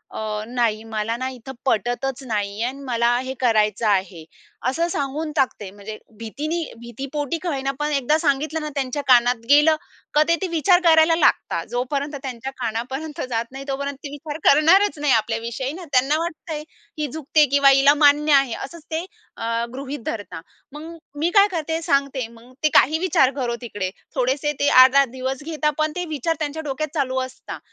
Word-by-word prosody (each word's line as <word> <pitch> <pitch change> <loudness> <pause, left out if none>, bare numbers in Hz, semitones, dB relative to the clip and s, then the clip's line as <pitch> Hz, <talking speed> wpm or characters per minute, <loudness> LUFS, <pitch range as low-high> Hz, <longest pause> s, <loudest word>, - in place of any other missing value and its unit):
अ, 215 -1 -3
"नाही, 230 -3 0
मला 220 0 -2
ना 260 +1 -3
इथं 260 0 -9
पटतच 255 +2 -1
नाही 205 -2 -2
आणि 260 +3 -3
मला 240 0 +2
हे 260 +1 -4
करायचं 215 -3 +2
आहे." 190 -4 0 0.5
असं 330 +6 0
सांगून 300 0 -3
टाकते. 255 -8 0
म्हणजे, 205 +2 -9 0.2
भीतीनी 300 +10 -3 0.2
भीती 235 +3 -7
पोटी 295 +1 -2
का 355 - -1
होईना, 275 -3 -1
पण 295 0 -1
एकदा 285 +1 +2
सांगितलं 310 +1 0
ना 305 - -4
त्यांच्या 275 +1 -2
कानात 245 -2 +4
गेलं, 300 +2 +6 0.4
का 300 - +5
ते 335 - +4
ते 380 - -1
विचार 355 +2 +3
करायला 325 -1 +5
लागतात. 330 - +1
जोपर्यंत 280 +4 -2
त्यांच्या 265 0 -5
कानापर्यंत 265 +7 -4
जात 230 -1 -1
नाही 270 +1 -8
तोपर्यंत 280 0 -3
ते 290 - -5
विचार 290 +1 -7
करणारच 335 +5 +5
नाही 290 -3 +2
आपल्याविषयी 230 +3 -1
ना, 355 +2 -8
त्यांना 270 +4 +3
वाटतंय, 320 -2 -5 0.3
ही 300 -1 -1
झुकते 305 0 +2
किंवा 280 -1 +6
हिला 275 +1 +6
मान्य 295 +1 +5
आहे 275 -4 +4
असंच 335 -2 -12
ते 320 +2 -2 0.3
अ, - - -6 0.3
गृहीत 275 +2 -6
धरतात. 200 -7 -5 0.3
मग 295 +2 -9 0.4
मी 325 +3 +2
काय 400 0 +7
करते, 325 -1 -2
सांगते, 275 -5 0
मग 235 +2 -17
ते 305 - +4
काही 305 +5 +5
विचार 330 -7 +3
करो 245 -4 -2
तिकडे. 205 -6 -4 0.3
थोडेसे 265 +3 0
ते 285 - +2
8-10 265 +1 +7
दिवस 260 +2 -5
घेतात, 305 -1 -1
पण 310 0 +1
ते 360 - -2
विचार 315 +2 -1
त्यांच्या 305 +1 -3
डोक्यात 290 +1 -3
चालू 260 -4 0
असतात 260 0 -7
275 Hz, 175 wpm, -22 LUFS, 240-305 Hz, 0.5 s, काय